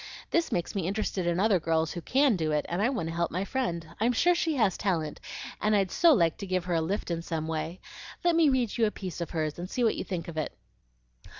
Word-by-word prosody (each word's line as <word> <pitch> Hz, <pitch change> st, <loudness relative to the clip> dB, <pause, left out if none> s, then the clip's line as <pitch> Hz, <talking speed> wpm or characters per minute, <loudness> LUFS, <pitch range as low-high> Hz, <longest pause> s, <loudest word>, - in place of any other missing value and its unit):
This 335 Hz, -1 st, +1 dB
makes 175 Hz, -1 st, -1 dB
me 190 Hz, -4 st, -1 dB
interested 195 Hz, -2 st, -1 dB
in 175 Hz, +1 st, +1 dB
other 200 Hz, -2 st, +4 dB
girls 160 Hz, 0 st, +1 dB
who 175 Hz, -, -5 dB
CAN 270 Hz, -, +3 dB
do 160 Hz, -3 st, -1 dB
it, 150 Hz, -1 st, +1 dB
and 175 Hz, +3 st, -1 dB
I 230 Hz, -, +3 dB
want 225 Hz, -12 st, -2 dB
to -, -, -4 dB
help 170 Hz, 0 st, 0 dB
my 185 Hz, +4 st, -2 dB
friend. 175 Hz, -11 st, -2 dB
I'm 235 Hz, +3 st, +2 dB
SURE 355 Hz, +9 st, +4 dB
she 330 Hz, -2 st, 0 dB
has 215 Hz, -8 st, +2 dB
talent, 165 Hz, -6 st, -1 dB, 0.4 s
and 215 Hz, 0 st, +3 dB
I'd 195 Hz, -3 st, +2 dB
so 340 Hz, -1 st, +5 dB
like 170 Hz, -, +3 dB
to 200 Hz, -, -6 dB
give 185 Hz, -1 st, -1 dB
her 180 Hz, -, -1 dB
a 165 Hz, -, +2 dB
lift 185 Hz, +3 st, -2 dB
in 165 Hz, 0 st, -1 dB
some 160 Hz, -2 st, -3 dB
way. 160 Hz, +2 st, -3 dB, 0.4 s
Let 345 Hz, -1 st, +3 dB
me 325 Hz, -3 st, +5 dB
read 245 Hz, -4 st, 0 dB
you 225 Hz, -, +5 dB
a -, -, +1 dB
piece 185 Hz, -4 st, -6 dB
of 170 Hz, -, -3 dB
hers 155 Hz, -1 st, -2 dB
and 180 Hz, +1 st, -5 dB
see 250 Hz, -, -1 dB
what 225 Hz, -, +3 dB
you -, -, -3 dB
think 180 Hz, -3 st, -4 dB
of 165 Hz, -2 st, -7 dB
it." 155 Hz, -, -3 dB
185 Hz, 265 wpm, -28 LUFS, 165-225 Hz, 0.4 s, so